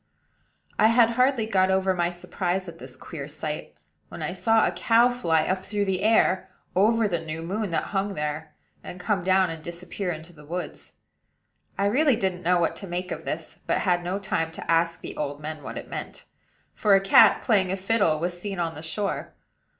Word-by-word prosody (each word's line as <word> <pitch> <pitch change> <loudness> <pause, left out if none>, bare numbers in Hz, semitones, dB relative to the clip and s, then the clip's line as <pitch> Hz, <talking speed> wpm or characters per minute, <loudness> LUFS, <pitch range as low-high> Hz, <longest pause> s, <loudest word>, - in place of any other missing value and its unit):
I 215 - +7
had 230 0 +5
hardly 250 -1 +2
got 190 -3 +2
over 190 0 +2
my 175 -1 0
surprise 180 +1 -3
at 165 -1 -10
this 130 -1 -9
queer 140 0 -7
sight, 150 0 -5 0.3
when - - -7
I - - -2
saw 225 -1 +3
a - - +1
cow 235 +2 +4
fly 165 -11 +1
up 185 +3 -1
through 205 0 -1
the 190 -1 -1
air, 195 -3 +3 0.3
over 220 +3 +4
the 175 -4 -1
new 160 0 -5
moon 200 +4 -2
that 165 - 0
hung 195 0 -1
there, 150 +1 -4 0.3
and 180 - -8
come 185 0 0
down 185 -1 +3
and 160 -1 -8
disappear 175 +2 -4
in 160 -1 -6
the 165 -3 -16
woods. 175 +4 -6 0.8
I 200 - +1
really 265 +6 +3
didn't 190 -4 -2
know 180 0 +3
what 170 - +1
to 195 - -7
make 180 +1 -4
of - - -5
this, - - -5
but - - +1
had 175 -2 +1
no 180 +2 -2
time 165 -5 -2
to - - -4
ask 165 0 +2
the - - -7
old 145 -1 -3
men 155 0 -6
what 130 -4 -7
it - - -7
meant; - - -7 0.5
for 205 -2 +4
a - - +6
cat, 195 +2 +6
playing 195 -6 +2
a 190 - -1
fiddle, 195 -5 +2
was 175 +2 -3
seen 200 -1 -4
on 165 -2 -1
the 155 - -9
shore. 195 +5 -3
185 Hz, 205 wpm, -25 LUFS, 165-205 Hz, 0.8 s, I